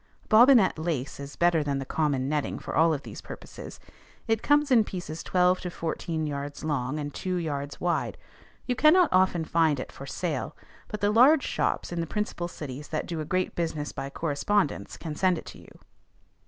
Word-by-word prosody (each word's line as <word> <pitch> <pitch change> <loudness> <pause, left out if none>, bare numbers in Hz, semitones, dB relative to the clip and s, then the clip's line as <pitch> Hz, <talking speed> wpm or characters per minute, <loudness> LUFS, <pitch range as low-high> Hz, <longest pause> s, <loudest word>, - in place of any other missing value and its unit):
Bobbinet 230 - +6
lace 155 -6 -3
is 140 0 -8
better 170 -2 +3
than 140 -1 -1
the 135 - -4
common 140 -3 0
netting 150 0 -1
for - - -6
all 165 +1 +5
of 145 -3 -2
these - - -9
purposes. - - -10 0.5
It 225 -1 +1
comes 290 -1 +3
in 230 -3 +6
pieces 175 -5 -6
twelve 180 0 +2
to 180 - -4
fourteen 165 -1 -3
yards 145 0 -5
long, 145 -2 -1
and 145 -1 -4
two 185 -1 -3
yards 145 -4 -3
wide. 175 -1 -1 0.5
You 250 - 0
cannot 315 +6 +5
often 185 -3 +3
find 160 -4 +2
it - - -6
for 135 - -10
sale; 155 -2 -3 0.3
but 210 - -6
the 205 0 +3
large 255 +8 +6
shops - - -1
in 170 -1 -2
the 165 - -3
principal 210 -3 -3
cities 145 -4 -7
that 155 - -3
do 165 -2 -4
a 155 - -3
great 185 +3 -1
business 160 -4 -2
by 135 - -5
correspondence 150 - -1
can 160 -3 -5
send 185 +2 +2
it - - -8
to - - -11
you. - - -17
165 Hz, 195 wpm, -27 LUFS, 145-185 Hz, 0.5 s, Bobbinet